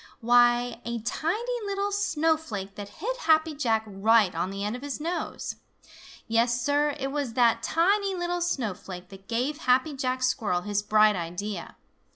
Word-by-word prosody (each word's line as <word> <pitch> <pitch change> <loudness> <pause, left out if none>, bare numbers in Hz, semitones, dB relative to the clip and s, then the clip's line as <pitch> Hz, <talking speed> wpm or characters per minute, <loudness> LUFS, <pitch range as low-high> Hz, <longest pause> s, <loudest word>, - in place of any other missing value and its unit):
Why, 240 0 +3
a 235 0 -3
tiny 430 - -2
little 400 0 -1
snowflake 315 - -1
that 205 0 -8
hit 450 - -4
Happy 320 -7 +3
Jack 230 -7 +1
right 210 0 +3
on 170 +3 -2
the 195 +1 -5
end 210 +3 -2
of 250 - -8
his 285 0 -4
nose! 335 +4 -4 0.7
Yes, 235 +1 +2
Sir, 290 +3 +1
it 270 0 -2
was 280 -5 -2
that 230 -1 +3
tiny 390 - +2
little 350 0 -2
snowflake 195 - -3
that 195 0 -14
gave 255 +6 -1
Happy 255 +4 +2
Jack 255 -1 -2
Squirrel 220 -8 +1
his 205 +1 -1
bright 215 0 +4
idea. 175 +3 -5
245 Hz, 160 wpm, -27 LUFS, 210-315 Hz, 0.7 s, bright